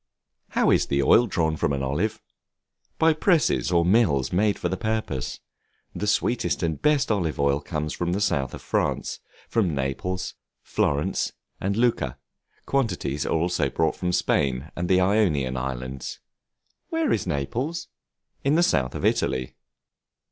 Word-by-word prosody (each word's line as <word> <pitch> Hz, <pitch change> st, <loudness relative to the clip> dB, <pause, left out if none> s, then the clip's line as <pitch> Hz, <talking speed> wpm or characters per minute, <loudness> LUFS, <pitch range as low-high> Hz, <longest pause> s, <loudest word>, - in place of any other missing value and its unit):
How -, -, +4 dB
is -, -, +3 dB
the 70 Hz, 0 st, +1 dB
Oil 120 Hz, -, +5 dB
drawn 80 Hz, -5 st, 0 dB
from 70 Hz, -, 0 dB
the 70 Hz, -, -1 dB
Olive? 85 Hz, +11 st, -1 dB, 0.7 s
By 160 Hz, 0 st, +4 dB
presses 155 Hz, -, +2 dB
or 85 Hz, -1 st, +3 dB
mills 90 Hz, -, +3 dB
made 105 Hz, +3 st, +2 dB
for -, -, -2 dB
the -, -, -1 dB
purpose. 110 Hz, -, -2 dB, 0.5 s
The 105 Hz, -, -3 dB
sweetest 115 Hz, 0 st, +1 dB
and 80 Hz, -3 st, -1 dB
best 150 Hz, -5 st, +3 dB
olive 85 Hz, -8 st, 0 dB
oil 70 Hz, 0 st, +2 dB
comes 75 Hz, -2 st, -3 dB
from 85 Hz, 0 st, -2 dB
the 100 Hz, -, 0 dB
South 70 Hz, -10 st, 0 dB
of -, -, -11 dB
France, -, -, -1 dB, 0.3 s
from 95 Hz, -9 st, +1 dB
Naples, 70 Hz, +8 st, -2 dB, 0.3 s
Florence, 70 Hz, +1 st, 0 dB, 0.3 s
and 100 Hz, +2 st, -1 dB
Lucca; 115 Hz, -, +1 dB, 0.5 s
quantities 90 Hz, -, -1 dB
are -, -, 0 dB
also 80 Hz, -3 st, +1 dB
brought 80 Hz, +3 st, 0 dB
from 90 Hz, -1 st, -1 dB
Spain 70 Hz, -4 st, 0 dB
and 85 Hz, 0 st, -2 dB
the 95 Hz, -, +5 dB
Ionian 90 Hz, -10 st, +2 dB
Islands. 65 Hz, 0 st, -4 dB, 0.7 s
Where 325 Hz, -2 st, 0 dB
is -, -, -1 dB
Naples? 125 Hz, -, -2 dB, 0.6 s
In 140 Hz, +2 st, +3 dB
the 170 Hz, -, +4 dB
South 65 Hz, -, +1 dB
of -, -, -2 dB
Italy. 65 Hz, -1 st, 0 dB
85 Hz, 150 wpm, -25 LUFS, 70-110 Hz, 0.7 s, Oil